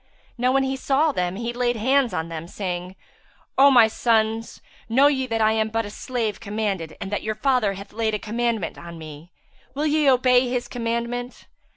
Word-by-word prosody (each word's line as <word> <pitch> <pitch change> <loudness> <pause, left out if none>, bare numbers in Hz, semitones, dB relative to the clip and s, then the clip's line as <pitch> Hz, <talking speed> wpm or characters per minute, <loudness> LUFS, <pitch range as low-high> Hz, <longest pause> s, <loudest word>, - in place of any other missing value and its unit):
Now 250 +1 +1
when 270 0 +3
he 265 0 -1
saw 280 +3 +2
them, 180 -6 -2
he 235 +3 -4
laid 245 0 0
hands 260 +2 +2
on 160 -2 -3
them, 165 0 -6
saying, 180 -1 -5 0.6
"Omy 265 -4 +7
sons, 225 0 0 0.3
know 260 +5 +4
ye 265 -3 +2
that 225 -2 -1
I 215 0 +4
am 220 0 0
but 225 0 -1
a 205 - -7
slave 230 -3 -3
commanded, 200 -7 -3
and 195 - -6
that 205 - -1
your 215 0 -3
father 250 -6 +1
hath 200 +1 -10
laid 220 -1 0
a - - 0
commandment 225 -2 -2
on 170 0 -9
me; 155 +1 -11 0.4
will 295 +2 -1
ye 300 -1 +3
obey 250 -1 +4
his 245 -1 -2
commandment?" 235 +1 -4
230 Hz, 190 wpm, -23 LUFS, 205-250 Hz, 0.6 s, Omy